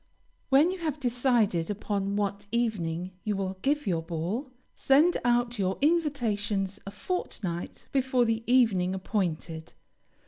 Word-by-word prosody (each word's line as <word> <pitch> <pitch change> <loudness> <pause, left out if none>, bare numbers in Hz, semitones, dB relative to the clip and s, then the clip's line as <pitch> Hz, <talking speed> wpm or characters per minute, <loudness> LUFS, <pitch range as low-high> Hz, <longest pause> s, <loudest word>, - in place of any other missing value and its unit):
When 290 +6 +5
you 375 - -5
have 310 -3 -2
decided 240 -9 +1
upon 200 -1 -2
what 205 0 -2
evening 185 -7 -1
you 210 -1 -1
will 190 -1 -3
give 295 +4 +1
your 170 -5 0
ball, 175 - -3 0.2
send 300 +6 +4
out 240 -1 +1
your 190 -1 0
invitations, 220 - 0
a - - -2
fortnight 195 - -4
before 260 -2 +2
the 225 0 0
evening 195 -8 +3
appointed. 170 -5 -3
210 Hz, 130 wpm, -28 LUFS, 190-260 Hz, 0.2 s, When